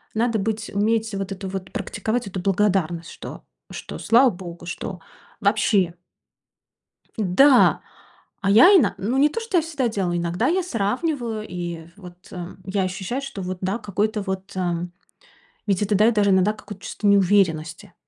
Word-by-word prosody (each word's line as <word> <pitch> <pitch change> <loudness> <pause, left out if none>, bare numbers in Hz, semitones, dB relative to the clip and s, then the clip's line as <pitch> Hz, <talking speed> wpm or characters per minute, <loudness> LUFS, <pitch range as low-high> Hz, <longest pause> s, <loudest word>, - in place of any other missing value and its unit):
надо 230 0 +1
быть, 220 +2 -3
уметь 220 +2 +1
вот 195 0 -4
эту 195 0 -6
вот 190 -1 -6
практиковать 225 +2 -3
эту 190 -1 -5
благодарность, 185 -4 0
что - - -9 0.3
что - - -7
слава 250 +3 +5
Богу, 175 -2 -9
что 180 +1 -6 0.4
вообще" 200 -4 +2 1.2
Да. 240 +6 +5 0.6
А 195 - 0
я 230 - +8
ино 275 - +4
ну, 235 +7 -1
не 290 +2 +5
то, 460 - -4
что 455 -5 0
я 330 - +4
всегда 290 -6 -1
делаю, 185 -5 -1
иногда 175 +7 0
я 370 +3 +1
сравниваю, 235 - -2
и 170 -2 -6
вот, 180 -3 -11 0.2
эм, 180 0 -8
я 195 +1 -1
ощущаю, 190 +7 -3
что 270 -7 -7
вот 185 0 -4
да, 190 +4 -1
какой-то 210 0 -1
вот, 190 0 -5
эм, 175 -1 -2 0.8
ведь 195 0 +1
это 205 0 +1
даёт 220 +3 +4
даже 205 -2 +3
иногда 190 +3 +3
какую-то 205 -2 -11
чувство 210 - -3
неуверенности. 190 -3 +2
200 Hz, 160 wpm, -23 LUFS, 185-225 Hz, 1.2 s, я